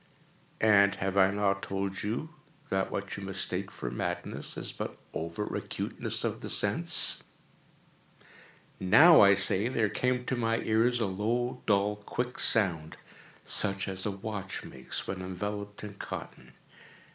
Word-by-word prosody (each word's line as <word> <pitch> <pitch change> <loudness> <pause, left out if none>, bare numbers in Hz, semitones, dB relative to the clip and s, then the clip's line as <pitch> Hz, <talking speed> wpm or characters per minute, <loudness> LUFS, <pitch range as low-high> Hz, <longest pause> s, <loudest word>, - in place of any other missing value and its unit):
And 100 -2 +5
have 95 +1 -3
I 95 -1 +5
not 100 -1 0
told 95 0 -4
you 120 +10 -3 0.4
that 95 0 0
what 100 0 -4
you 100 - -7
mistake 95 0 -1
for - - -6
madness 85 +7 -4
is - - -4
but - - -6 0.2
over 85 +6 -4
acuteness - - -4
of - - -3
the - - -6
sense?—now, 145 - +2
I 100 -1 +7
say, 95 +2 +2
there 115 -4 0
came 125 +2 -1
to 130 - -1
my 115 -1 0
ears 115 +3 +2
a - - +2
low, 120 +6 -2
dull, 105 0 +2
quick 125 +4 -4
sound, 85 -8 +1 0.5
such 100 -1 +2
as 95 -1 +2
a - - 0
watch 100 -1 -5
makes 65 0 -4
when 95 -1 -5
enveloped 105 +3 -5
in 105 -1 -7
cotton. 100 - -8
100 Hz, 140 wpm, -29 LUFS, 95-110 Hz, 0.5 s, I